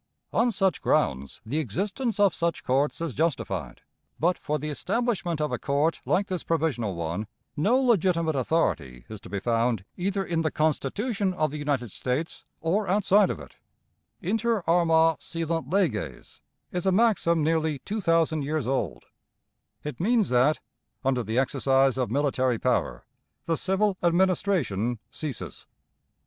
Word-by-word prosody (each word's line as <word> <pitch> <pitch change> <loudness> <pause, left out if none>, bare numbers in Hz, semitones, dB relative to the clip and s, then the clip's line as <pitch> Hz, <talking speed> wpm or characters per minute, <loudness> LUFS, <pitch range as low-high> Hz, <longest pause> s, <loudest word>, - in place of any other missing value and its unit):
On 240 - +3
such 195 -6 +1
grounds 65 +1 0
the 140 +8 -1
existence 200 - -2
of 200 -4 +5
such 170 0 -1
courts 140 +5 +1
is 165 -5 -2
justified; 100 - -2 0.4
but, 175 +4 +2
for 150 -2 -2
the 150 +1 -4
establishment 190 - -1
of 150 -2 -1
a 125 - -2
court 145 +4 0
like 200 - +2
this 185 -3 -3
provisional 135 - 0
one, 85 +5 -3 0.3
no 205 - +3
legitimate 180 - +2
authority 85 - 0
is 110 -2 -8
to - - -11
be 100 - -2
found 115 -1 0
either 195 +2 -1
in 165 -2 0
the 160 - +1
Constitution 185 - 0
of 155 -4 0
the 150 - -5
United 140 -6 -1
States 130 - -3 0.2
or 190 +6 0
outside 200 +1 +4
of - - -3
it, 70 -4 -13 0.6
"Inter 225 +2 0
arma 165 -2 +4
silent 165 -4 -3
leges" 110 - -2 0.3
is 180 +1 -2
a - - +5
maxim 185 -6 +3
nearly 160 -1 +1
two 210 +11 -4
thousand 165 -3 +2
years 150 -1 -1
old; 135 +2 -2 0.8
it 150 -5 -6
means 220 +2 +2
that, 125 +5 +3 0.5
under 130 -2 +2
the 110 +1 -3
exercise 135 0 +3
of 125 - 0
military 130 -2 +1
power, - - -1 0.4
the 165 - +1
civil 195 +3 +1
administration 170 - +1
ceases. 150 -6 -6
160 Hz, 150 wpm, -26 LUFS, 130-185 Hz, 0.8 s, of